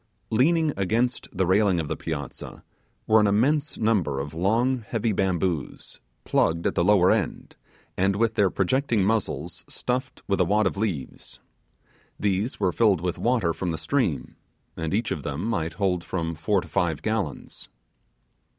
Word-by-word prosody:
Leaning 155 Hz, +6 st, +3 dB
against 115 Hz, +6 st, 0 dB
the 95 Hz, -1 st, 0 dB
railing 95 Hz, 0 st, +3 dB
on 80 Hz, -, -2 dB
the -, -, -3 dB
piazza 75 Hz, -4 st, -6 dB, 0.4 s
were 110 Hz, 0 st, +5 dB
an 105 Hz, -, +4 dB
immense 140 Hz, +9 st, +1 dB
number 95 Hz, -11 st, +1 dB
of 70 Hz, +2 st, -5 dB
long, 115 Hz, +10 st, +1 dB
heavy 115 Hz, 0 st, -2 dB
bamboos, 90 Hz, -5 st, -2 dB, 0.2 s
plugged 85 Hz, +1 st, +1 dB
at -, -, +1 dB
the -, -, +1 dB
lower 95 Hz, -1 st, +5 dB
end, -, -, -2 dB, 0.4 s
and 95 Hz, +1 st, +1 dB
with 115 Hz, +2 st, +1 dB
their 100 Hz, -4 st, +3 dB
projecting 115 Hz, +2 st, +1 dB
muzzles 90 Hz, -7 st, -2 dB
stuffed 130 Hz, +1 st, -3 dB
with 100 Hz, -1 st, +1 dB
a -, -, +4 dB
wad 105 Hz, +4 st, +2 dB
of 95 Hz, -, 0 dB
leaves. 95 Hz, -, -4 dB, 0.8 s
These 100 Hz, +4 st, -1 dB
were 95 Hz, -3 st, +2 dB
filled 100 Hz, -4 st, +3 dB
with 90 Hz, 0 st, -2 dB
water 115 Hz, -9 st, +1 dB
from 90 Hz, -, -3 dB
the 80 Hz, -, -2 dB
stream, -, -, -1 dB, 0.4 s
and 80 Hz, -1 st, -3 dB
each 110 Hz, +3 st, 0 dB
of 75 Hz, -, -2 dB
them 75 Hz, +7 st, -4 dB
might 85 Hz, -8 st, -1 dB
hold 90 Hz, -1 st, 0 dB
from 85 Hz, -2 st, -3 dB
four 85 Hz, +5 st, 0 dB
to 90 Hz, -, -11 dB
five 80 Hz, 0 st, -1 dB
gallons. 110 Hz, -10 st, -3 dB
95 Hz, 160 wpm, -25 LUFS, 85-110 Hz, 0.8 s, were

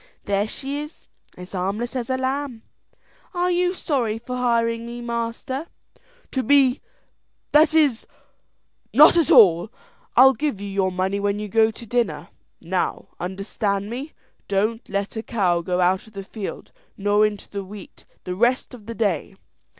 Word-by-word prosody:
There 200 Hz, +1 st, +1 dB
she 275 Hz, +5 st, -4 dB
is 300 Hz, +1 st, -11 dB, 0.3 s
as 180 Hz, 0 st, -10 dB
harmless 200 Hz, +7 st, -3 dB
as 250 Hz, 0 st, -3 dB
a 260 Hz, -, +1 dB
lamb. 260 Hz, -2 st, -3 dB, 0.7 s
Are 355 Hz, +1 st, +1 dB
you 360 Hz, +1 st, +1 dB
sorry 245 Hz, -11 st, -1 dB
for 245 Hz, +2 st, -6 dB
hiring 230 Hz, -2 st, +1 dB
me, 240 Hz, 0 st, -7 dB
master?" 235 Hz, +5 st, -4 dB, 0.6 s
"To 265 Hz, -, 0 dB
be 270 Hz, 0 st, +4 dB, 0.7 s
that 310 Hz, +1 st, +5 dB
is, 285 Hz, -8 st, +3 dB, 0.9 s
not -, -, +8 dB
at 335 Hz, -3 st, +3 dB
all. 210 Hz, -, +6 dB, 0.4 s
I'll 265 Hz, +2 st, +8 dB
give 285 Hz, -7 st, -2 dB
you 205 Hz, -, -5 dB
your 195 Hz, -1 st, 0 dB
money 190 Hz, +2 st, -1 dB
when 200 Hz, 0 st, 0 dB
you 210 Hz, 0 st, -4 dB
go 220 Hz, +2 st, +4 dB
to 225 Hz, +1 st, -10 dB
dinner. 240 Hz, +1 st, -1 dB, 0.3 s
Now, -, -, -2 dB
understand 200 Hz, +2 st, -2 dB
me; 270 Hz, +6 st, -6 dB, 0.3 s
don't 215 Hz, +4 st, -1 dB
let 200 Hz, +1 st, -2 dB
a -, -, -1 dB
cow 185 Hz, -7 st, +1 dB
go 180 Hz, +1 st, -1 dB
out 185 Hz, +3 st, +2 dB
of 220 Hz, -, -17 dB
the 195 Hz, -1 st, -6 dB
field 200 Hz, 0 st, -7 dB, 0.3 s
nor 205 Hz, +1 st, +3 dB
into 210 Hz, -1 st, -1 dB
the 200 Hz, -1 st, -5 dB
wheat 195 Hz, 0 st, -12 dB, 0.2 s
the 180 Hz, -, -4 dB
rest 240 Hz, +7 st, +1 dB
of 225 Hz, -4 st, -12 dB
the 230 Hz, -, -5 dB
day." 195 Hz, -4 st, -1 dB
225 Hz, 160 wpm, -23 LUFS, 200-260 Hz, 0.9 s, not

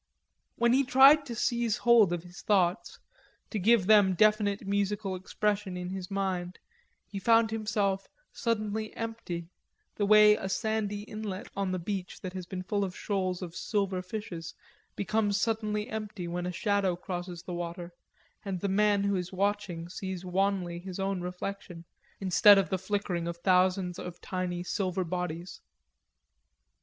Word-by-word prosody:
When 235 Hz, 0 st, +3 dB
he 270 Hz, +2 st, +4 dB
tried 275 Hz, +3 st, +6 dB
to 235 Hz, -, -5 dB
seize 235 Hz, -2 st, 0 dB
hold 235 Hz, -6 st, +5 dB
of 175 Hz, -1 st, -2 dB
his 175 Hz, +1 st, -12 dB
thoughts, 190 Hz, -2 st, +1 dB, 0.5 s
to 215 Hz, -, -2 dB
give 215 Hz, 0 st, +4 dB
them 205 Hz, -2 st, +5 dB
definite 210 Hz, 0 st, +2 dB
musical 200 Hz, 0 st, -1 dB
expression 200 Hz, 0 st, -2 dB
in 180 Hz, 0 st, -5 dB
his 190 Hz, -1 st, -5 dB
mind, 185 Hz, -2 st, -2 dB, 0.5 s
he 200 Hz, -, -6 dB
found 225 Hz, +2 st, +4 dB
himself 210 Hz, -3 st, -1 dB, 0.3 s
suddenly 215 Hz, -2 st, -2 dB
empty, 225 Hz, -7 st, -5 dB, 0.5 s
the 205 Hz, -, +1 dB
way 210 Hz, 0 st, +7 dB
a 190 Hz, -, -4 dB
sandy 210 Hz, -1 st, -1 dB
inlet 210 Hz, -3 st, -6 dB
on 195 Hz, -1 st, -1 dB
the 185 Hz, -, -1 dB
beach 185 Hz, +1 st, -5 dB
that 185 Hz, -2 st, -6 dB
has 185 Hz, -2 st, -6 dB
been 185 Hz, -1 st, -5 dB
full 200 Hz, +2 st, -1 dB
of 185 Hz, -2 st, -4 dB
shoals 185 Hz, -3 st, -2 dB
of 175 Hz, -1 st, -8 dB
silver 195 Hz, -3 st, -1 dB
fishes, 180 Hz, -4 st, -6 dB, 0.4 s
becomes 205 Hz, +1 st, 0 dB
suddenly 215 Hz, -2 st, -1 dB
empty 210 Hz, -4 st, -5 dB
when 175 Hz, +1 st, -3 dB
a -, -, -2 dB
shadow 195 Hz, -1 st, +1 dB
crosses 175 Hz, -1 st, -6 dB
the 180 Hz, -, -6 dB
water, 175 Hz, 0 st, -5 dB, 0.5 s
and 195 Hz, -3 st, -3 dB
the 200 Hz, -, -1 dB
man 205 Hz, +1 st, +3 dB
who 200 Hz, 0 st, +1 dB
is 180 Hz, -1 st, -3 dB
watching 190 Hz, -3 st, -1 dB
sees 185 Hz, 0 st, -6 dB
wanly 185 Hz, -2 st, 0 dB
his 185 Hz, 0 st, -7 dB
own 195 Hz, -1 st, -1 dB
reflection 180 Hz, -1 st, -6 dB, 0.3 s
instead 195 Hz, +2 st, +6 dB
of 195 Hz, 0 st, +1 dB
the 190 Hz, -, 0 dB
flickering 190 Hz, -3 st, -2 dB
of 170 Hz, 0 st, -4 dB
thousands 185 Hz, 0 st, +2 dB
of 175 Hz, -1 st, -7 dB
tiny 180 Hz, -1 st, -3 dB
silver 185 Hz, -1 st, -1 dB
bodies. 180 Hz, 0 st, -4 dB
195 Hz, 155 wpm, -29 LUFS, 180-210 Hz, 0.5 s, way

